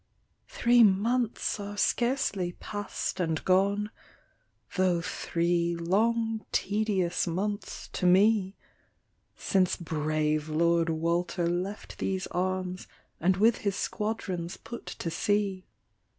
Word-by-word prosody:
" - - -45
Three 240 0 +4
months 225 +4 +1
are 205 0 -6
scarcely 205 -8 +1
pass'd 205 0 -4
and 160 -3 -1
gone, 200 +3 +2 0.8
Tho' 185 -2 +2
three 170 0 0
long 220 +6 +1
tedious 200 -5 0
months 200 +4 -3
to 180 - -1
me, 195 +1 +4 0.8
Since 185 -3 +1
brave 155 -1 -1
Lord 170 +1 +2
Walter 170 +2 0
left 180 +4 -3
these 190 -1 -1
arms, 185 0 -2 0.3
And 185 +2 +2
with 220 +3 +4
his 200 -2 -1
squadrons 190 -6 -3
put 235 - -9
to 165 - -4
sea. 200 -1 0
185 Hz, 105 wpm, -28 LUFS, 170-210 Hz, 0.8 s, Three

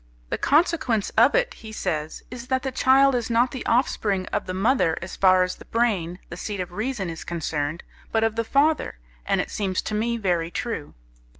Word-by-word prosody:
The - - -1
consequence 290 - +2
of 235 +5 +5
it, - - +2
he 220 - -11
says, 155 -7 -3
is 250 -1 -8
that 260 -1 0
the 265 - -2
child 270 +1 +4
is 240 -2 -1
not 235 +2 +3
the 260 - -5
offspring 210 -6 +1
of 205 - -1
the 185 - -3
mother 195 -4 +2
as 175 - -7
far 185 -1 +5
as 180 - -3
the - - -13
brain, 200 -7 0
the 170 - -7
seat 205 +1 -4
of 180 -1 -4
reason, 215 0 -3
is 165 -1 -6
concerned, 160 -1 -3 0.3
but 225 0 +2
of 225 -1 +1
the 230 - 0
father, 285 - +1 0.3
and - - +2
it - - -2
seems 190 -3 -1
to - - -4
me 235 +2 0
very 175 -6 0
true. 200 -6 -4
220 Hz, 205 wpm, -24 LUFS, 180-250 Hz, 0.3 s, of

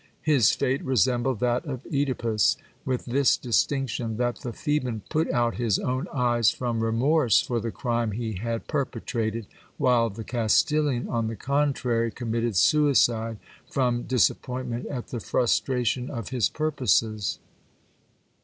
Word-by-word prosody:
His 140 -8 +4
fate 135 0 0
resembled 125 -1 +1
that 125 +1 +1
of 135 -4 -5
CEdipus, 125 -8 +1 0.3
with 130 -2 -2
this 135 +2 +3
distinction; 120 -2 -1
that 120 0 0
the 120 - -6
Theban 125 -6 -2
put 160 +1 +1
out 120 -2 +1
his 115 -4 +1
own 130 +6 -2
eyes 120 -4 +2
from 120 -2 -2
remorse 120 +3 +3
for 120 -1 -1
the 115 - -3
crime 120 -2 -1
he 110 0 -3
had 115 +4 -3
per 145 -3 0
petrated, 115 -3 -4 0.3
while 120 -2 +3
the 110 +2 -7
Castilian, 125 +4 +1
on 115 -2 -1
the 115 - -4
contrary, 130 -2 0
committed 115 -1 -2
suicide 120 - +3 0.3
from 125 -3 0
disap 130 -3 +2
pointment 125 -2 -4
at 130 -5 -5
the 120 - -4
frustration 125 +1 0
of 115 -6 -5
his 125 -6 +1
purposes. 115 - 0
120 Hz, 140 wpm, -26 LUFS, 115-130 Hz, 0.3 s, His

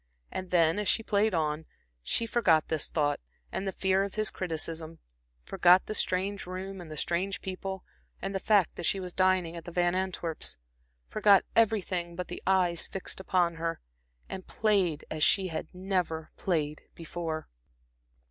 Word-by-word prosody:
And 185 -1 -5
then, 165 +1 +3
as 210 - -2
she 225 - +2
played 205 -1 +2
on, 155 0 -1 0.3
she 230 - 0
forgot 200 -9 +3
this 160 -2 0
thought, 145 -2 +1 0.3
and 195 - -3
the - - 0
fear 190 0 +2
of 200 - -5
his 215 -2 0
criticism; 165 -2 -4 0.5
forgot 180 -1 +5
the - - -3
strange 195 -1 0
room, 190 +1 -5
and 170 - -10
the 155 - -7
strange 185 +6 0
people, 190 0 -5 0.4
and 195 - -3
the 195 - -1
fact 200 -3 +3
that 175 - -3
she 195 - +1
was 180 -1 -5
dining 185 -3 +2
at 170 -1 -8
the 175 - -7
Van 175 0 +2
Antwerps'; 180 - -2 0.5
forgot 205 -2 +5
everything 185 -6 +2
but 180 +1 -4
the 175 - -6
eyes 180 -3 +2
fixed 195 - -3
upon 175 -3 +1
her, 165 0 -2 0.5
and 190 -1 -7
played 195 -8 +1
as 155 -1 -1
she 190 +1 +4
had 160 -1 -4
never 180 -4 -2
played 155 -5 -1
before. 165 -1 -4
180 Hz, 165 wpm, -29 LUFS, 165-195 Hz, 0.5 s, forgot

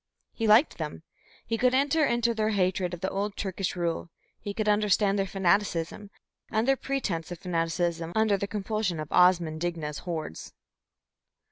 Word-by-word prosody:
He 225 - -1
liked 220 +8 +5
them; - - -5 0.4
he 225 -1 -2
could 250 0 +3
enter 285 +4 +3
into 235 -3 +2
their 215 -1 0
hatred 185 -3 0
of 175 - -16
the 190 - -1
old 200 +1 -3
Turkish 190 -1 -2
rule, 170 -1 -2 0.3
he 205 - -5
could 215 +1 -2
understand 205 -1 +3
their 195 - 0
fanaticism, 195 0 0 0.4
and 220 +2 0
their 270 - +5
pretence 200 -13 -3
of 175 - -5
fanaticism 170 -1 -1
under 220 -2 +3
the 200 +1 -3
compulsion 205 -3 -2
of 155 0 -6
Osman 175 -3 +4
Digna's 160 -3 -3
hordes. 160 - -6
195 Hz, 160 wpm, -28 LUFS, 175-215 Hz, 0.4 s, liked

